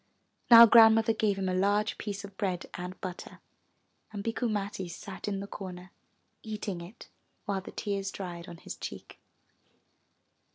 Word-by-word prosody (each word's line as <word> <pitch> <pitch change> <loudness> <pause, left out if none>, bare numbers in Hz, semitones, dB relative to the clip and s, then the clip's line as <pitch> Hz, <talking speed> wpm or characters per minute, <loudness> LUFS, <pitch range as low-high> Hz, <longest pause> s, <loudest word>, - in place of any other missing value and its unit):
Now 235 -1 +12
Grandmother 225 0 +6
gave 210 -2 0
him 190 -1 -2
a 185 - 0
large 205 +3 +1
piece 205 -1 -5
of 200 -1 -13
bread 185 -3 -2
and 180 +1 -7
butter, 180 -2 -7 0.7
and 205 -2 -6
Bikku 230 +2 -1
Matti 200 -3 -3
sat 190 +4 -8
in 195 -1 -2
the - - -5
corner 185 -2 -9 0.5
eating 210 -5 -5
it 180 +7 -12 0.4
while 200 -2 -2
the - - -10
tears 200 -1 -3
dried 175 -3 -7
on 170 - -9
his - - -8
cheek. - - -9
200 Hz, 155 wpm, -29 LUFS, 185-215 Hz, 0.7 s, Now